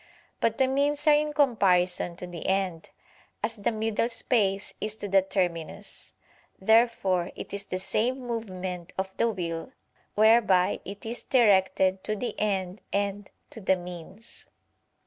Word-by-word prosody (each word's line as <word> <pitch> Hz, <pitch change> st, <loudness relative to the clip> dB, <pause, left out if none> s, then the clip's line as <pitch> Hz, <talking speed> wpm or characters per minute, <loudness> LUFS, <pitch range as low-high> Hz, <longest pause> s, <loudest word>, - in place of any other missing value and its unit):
But 230 Hz, -1 st, +1 dB
the 265 Hz, -, +4 dB
means 285 Hz, +2 st, 0 dB
are 305 Hz, -, +7 dB
in 300 Hz, 0 st, +2 dB
comparison 185 Hz, -, +2 dB
to 180 Hz, -, -7 dB
the 175 Hz, -2 st, -7 dB
end, 190 Hz, -4 st, -1 dB, 0.5 s
as 230 Hz, -, -1 dB
the 205 Hz, -, 0 dB
middle 220 Hz, +1 st, 0 dB
space 210 Hz, -4 st, 0 dB
is 215 Hz, 0 st, -3 dB
to 205 Hz, -, -6 dB
the 195 Hz, 0 st, +5 dB
terminus. 185 Hz, 0 st, -3 dB, 0.5 s
Therefore 195 Hz, -4 st, +3 dB
it -, -, -8 dB
is 200 Hz, 0 st, -4 dB
the 185 Hz, -, -3 dB
same 240 Hz, +7 st, 0 dB
movement 190 Hz, -8 st, -5 dB
of 190 Hz, 0 st, -3 dB
the 230 Hz, -, +3 dB
will 170 Hz, +2 st, -4 dB, 0.4 s
whereby 215 Hz, -4 st, +4 dB
it 200 Hz, +2 st, -8 dB
is 230 Hz, +2 st, -4 dB
directed 190 Hz, -5 st, +3 dB
to 215 Hz, -, -1 dB
the 230 Hz, +1 st, -3 dB
end 195 Hz, -2 st, -1 dB
and 200 Hz, 0 st, -1 dB, 0.2 s
to 225 Hz, -, -7 dB
the 190 Hz, 0 st, +3 dB
means. 180 Hz, +4 st, -9 dB
200 Hz, 145 wpm, -27 LUFS, 185-230 Hz, 0.5 s, are